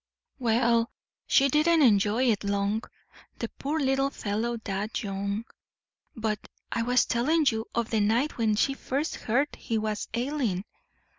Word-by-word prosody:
"Well, 235 -1 +2 0.4
she 275 - +5
didn't 310 +3 +4
enjoy 220 +2 +4
it 210 - -1
long. 200 +2 0 0.6
The - - -3
poor 300 +3 -1
little 270 -1 +2
fellow 230 0 -2
died 210 0 -3
young. 200 +2 -3 0.7
But 215 -2 -1 0.3
I - - 0
was 250 +2 +3
telling 300 +7 +2
you 220 -1 -3
of 235 -1 -1
the 220 - +2
night 230 +8 +1
when 220 -2 +2
she 275 +5 +2
first 275 +3 -2
heard 265 +6 0
he 225 - -2
was 215 -1 -2
ailing. 240 -7 -1
230 Hz, 145 wpm, -27 LUFS, 210-270 Hz, 0.7 s, she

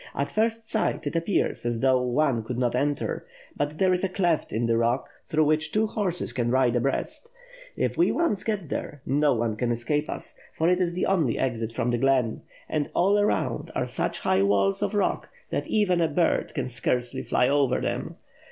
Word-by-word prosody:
At 140 - -2
first 225 +1 0
sight, 220 -7 -1
it 145 - -3
appears 170 +4 0
as 120 -1 -1
though 130 -1 +4
one 125 -1 +1
could 120 +2 -5
not 120 -1 +1
enter; 145 +3 -1 0.3
but 145 +1 -2
there 185 +1 +3
is 180 - -1
a 195 - +1
cleft 175 -4 0
in 115 +2 0
the 115 0 +2
rock, 115 +3 +1 0.2
through 155 0 +2
which 155 +1 +1
two 215 +4 +2
horses 185 - -1
can 120 -2 0
ride 125 -1 +3
abreast. 135 - -1 0.5
If - - -1
we 345 - +4
once 320 - 0
get 200 -8 -2
there, 145 -1 -5
no 145 0 +2
one 115 -1 -1
can 120 +1 -1
escape 145 +6 -1
us, - - -7 0.2
for 160 - +2
it 180 +1 +2
is 175 -1 0
the 180 - 0
only 165 -11 +1
exit 115 -3 -1
from 115 +1 -1
the 120 - 0
glen; 130 -3 +2 0.3
and 150 -2 -1
all 200 +4 +3
around 205 - 0
are - - 0
such - - -2
high 95 - +2
walls 100 0 +2
of - - -1
rock 205 - 0 0.2
than - - -2
even 185 -5 +2
a 165 - +3
bird 165 +2 0
can 135 -5 -1
scarcely 125 0 -1
fiy 125 - +2
over 140 -1 +2
them. - - -3
145 Hz, 205 wpm, -26 LUFS, 120-180 Hz, 0.5 s, though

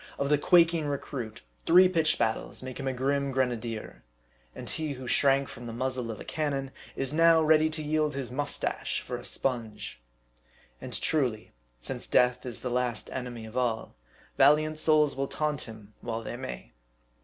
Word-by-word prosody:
Of 140 - -1
the 150 - +5
quaking 165 -1 +4
recruit, 135 -5 -5 0.2
three 180 +2 +8
pitched 165 -4 +3
battles 115 +2 -2
make 130 0 -7
a 135 -1 -1
grim 140 +2 0
grenadier; 120 -4 -2 0.5
and - - -8
he 155 -2 -2
who 130 -1 -8
shrank 135 +1 +3
from 120 0 -9
the 115 - -6
muzzle 125 0 -2
of 110 - -5
a - - -7
cannon, 140 -3 -2 0.2
is 135 +1 -1
now 165 +1 +6
ready 155 0 +4
to 155 0 -3
yield 150 -1 0
his 135 -3 -3
mustache 145 +3 -1
for - - -5
a - - -10
sponge. 110 - -3 0.8
And - - -2
truly, 125 -8 0 0.3
since - - -6
death 125 0 +2
is 120 - -2
the 125 - -3
last 125 -2 -1
enemy 125 -3 -5
of 110 - -11
all, 120 -3 -1 0.4
valiant 155 +3 +5
souls 155 -2 +4
will 135 0 -1
taunt 150 -1 -1
him 110 -2 -12
while 115 -1 -4
they 120 - -5
may. 120 - -7
135 Hz, 170 wpm, -28 LUFS, 120-150 Hz, 0.8 s, three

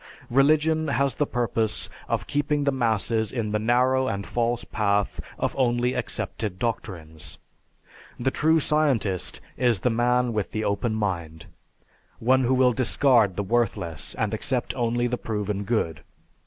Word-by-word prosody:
Religion 155 +4 +3
has 140 0 +1
the 145 - -1
purpose 115 -3 -1 0.2
of - - -1
keeping 145 0 0
the 140 - +2
masses 115 -3 0
in 115 -4 -2
the 105 - 0
narrow 130 +4 +2
and 100 -3 -3
false 120 0 -1
path 100 -3 0 0.2
of - - -2
only 125 -1 +1
accepted 105 -6 -3
doctrines. 85 -9 -5 0.8
The 130 +2 +1
true 160 +3 +3
scientist 135 - 0 0.2
is 120 -7 +2
the 125 - +2
man 120 +1 +2
with 105 -3 -2
the 110 - -1
open 110 +2 0
mind, 85 -7 -3 0.7
one 130 +2 +3
who 130 +2 +3
will 125 -1 +4
discard 120 -5 +3
the 100 - -1
worthless 95 - -1
and - - -1
accept - - -1
only 120 0 0
the 120 0 -1
proven 105 -2 -3
good. 90 -8 -1
120 Hz, 145 wpm, -25 LUFS, 105-130 Hz, 0.8 s, will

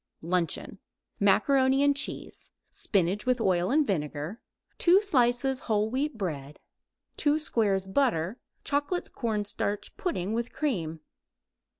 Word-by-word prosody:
] - - -51
LUNCHEON 175 -3 -1 0.4
Macaroni 270 -1 +4
and 285 0 +4
cheese; 280 - -4 0.2
spinach 195 +3 0
with 255 -1 +2
oil 185 -4 +2
and 300 +2 +3
vinegar; 150 - -3 0.4
2 360 +2 +6
slices 260 - +2
whole 215 -3 0
wheat 275 +1 -1
bread; 150 -8 -4 0.6
2 295 0 +3
squares 210 -10 0
butter; 195 - 0 0.2
chocolate 290 +5 -1
cornstarch 210 -3 -2
pudding 210 - -2
with 235 +1 -2
cream. 165 - -2
225 Hz, 115 wpm, -28 LUFS, 185-275 Hz, 0.6 s, 2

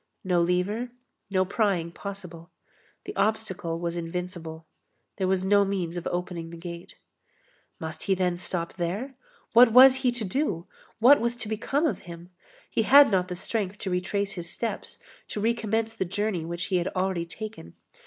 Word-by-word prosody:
No 180 -2 +2
lever; 180 +8 0 0.4
no 190 -1 +2
prying 190 -4 0
possible. 180 -3 -8 0.6
The - - -6
obstacle 195 -5 -1
was 170 0 -3
invincible. 170 -1 -5 0.5
There 190 -2 0
was 190 0 +1
no 200 +1 +5
means 185 -4 -2
of 175 - -4
opening 175 -2 -3
the 170 - -9
gate. 170 0 -8 0.8
Must 160 0 -6
he 195 - +1
then 180 -1 +1
stop 175 -1 -3
there? 195 +10 -2 0.4
What 235 0 +8
was 260 +1 +9
he 260 -2 +1
to 240 -3 -3
do? 190 - -1 0.3
What 250 +5 +7
was 235 +1 0
to 230 - -4
become 250 +8 0
of 315 - 0
him? 170 +1 -10 0.4
He - - 0
had 275 +2 +7
not 185 -2 +2
the 180 - -4
strength 205 +1 -3
to 195 - -4
retrace 195 +2 -1
his 175 -3 -6
steps, 230 +5 -4 0.3
to - - -4
recommence 225 0 0
the 220 - -1
journey 195 -2 -2
which 170 +1 -4
he - - +5
had 175 +1 0
already 185 -2 0
taken. 215 +5 -8
190 Hz, 170 wpm, -27 LUFS, 175-220 Hz, 0.8 s, was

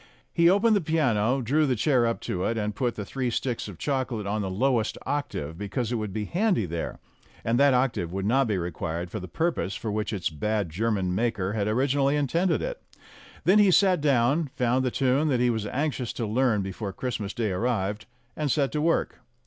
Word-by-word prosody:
He 170 0 +5
opened 210 +4 +4
the 200 - +2
piano, 135 -6 +1
drew 150 +6 +2
the 130 - +1
chair 125 0 +2
up 115 - -2
to 90 - -3
it, 115 - 0
and 105 -1 -1
put 120 +2 -1
the 105 - -5
three 130 +3 -2
sticks 120 -1 -2
of 100 -5 -9
chocolate 130 - -2
on 105 +2 -1
the 95 - -2
lowest 115 +3 +1
octave, 85 - -3
because 105 +4 -3
it - - 0
would 105 -2 -3
be 105 +2 -3
handy 180 - +1
there, 85 -1 -4 0.5
and 115 +2 +2
that 140 -2 +5
octave 125 -10 0
would 95 +1 -3
not 130 +4 +3
be 105 -3 0
required 85 0 -4
for 110 - -4
the 90 - -7
purpose 160 - -1
for 110 - -4
which 105 +1 -2
its 95 -6 -2
bad 100 +3 -1
German 100 -1 0
maker 105 -2 -1
had 105 -2 -1
originally 135 +5 +2
intended 165 +6 +1
it. - - -4 0.6
Then 195 +4 +5
he 205 -2 +6
sat 185 -2 +4
down, 140 +2 +2
found 125 +1 +1
the 130 - +1
tune 135 +4 +1
that 130 -5 +1
he 120 0 +3
was 110 -2 -2
anxious 130 -1 -2
to 115 - -3
learn 110 -1 +1
before 95 +2 -5
Christmas 110 -3 -4
Day 110 -4 -1
arrived, 105 0 -1 0.3
and 150 -3 -1
set 140 -1 +1
to 150 - -1
work. 165 +2 0
120 Hz, 210 wpm, -26 LUFS, 105-140 Hz, 0.6 s, he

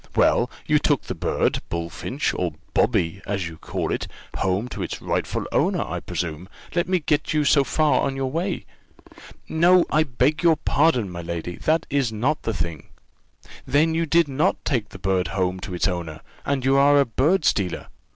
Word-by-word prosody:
Well, - - +3 0.2
you - - +3
took - - +1
the - - -4
bird, - - 0
bullfinch, 85 - -3
or 85 -4 -2 0.2
Bobby, 85 +3 +1
as 100 -3 -2
you 80 -1 -9
call - - -3
it, - - -2 0.3
home 95 +5 0
to - - -6
its - - -4
rightful - - -2
owner, - - +1
I - - -4
presume? 85 +2 -5 0.2
Let 175 +1 0
me 185 - +3
get 155 -1 0
you 150 -1 +2
so 140 0 +5
far 145 +2 +2
on 135 - -1
your 135 -1 -2
way." 175 +4 -2 0.8
"No, 175 +2 +4
I 155 - +4
beg 150 +2 +1
your 170 -2 +5
pardon, 140 - +2
my 85 -1 -6
lady, 85 +1 -5
that 160 +1 +1
is 135 -5 +1
not 125 +8 0
the - - -2
thing." 85 -4 -4 0.8
"Then 155 +3 +3
you 165 0 0
did 165 +1 +4
not 145 +7 0
take 120 -7 0
the - - -10
bird 95 -1 0
home 95 -1 -1
to 90 - -6
its 90 - +1
owner 85 -4 -4 0.3
and 140 -2 0
you 135 +1 +4
are 145 +1 +6
a 140 - +4
bird 150 - +1
stealer? 95 -4 0
130 Hz, 190 wpm, -23 LUFS, 90-155 Hz, 0.8 s, are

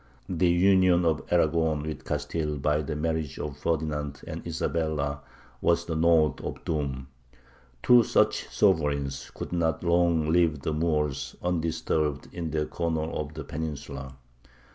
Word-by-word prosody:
The 90 -1 +2
union 90 0 +4
of 80 -2 +2
Aragon 80 -3 +2
with 80 0 -6
Castile 75 +1 -2
by 75 +2 +1
the 75 +1 -4
marriage 80 -1 -2
of 75 -2 -4
Ferdinand 75 -3 -2
and - - -6
Isabella 80 -3 -1 0.4
was 85 0 +2
the 80 - -3
note 80 -1 +3
of - - -6
doom. 70 -4 -2 0.8
Two 125 -1 +7
such - - +1
sovereigns 70 -8 +1
could - - -6
not 80 -2 0
long 85 -2 +3
leave 80 -3 +3
the 80 - -2
Moors 75 -3 -1
undisturbed 80 -4 -1
in 85 -2 -4
their 75 0 -1
corner 80 -2 -2
of 75 0 -4
the 80 - -5
peninsula. 70 -3 -6
80 Hz, 140 wpm, -27 LUFS, 75-85 Hz, 0.8 s, Two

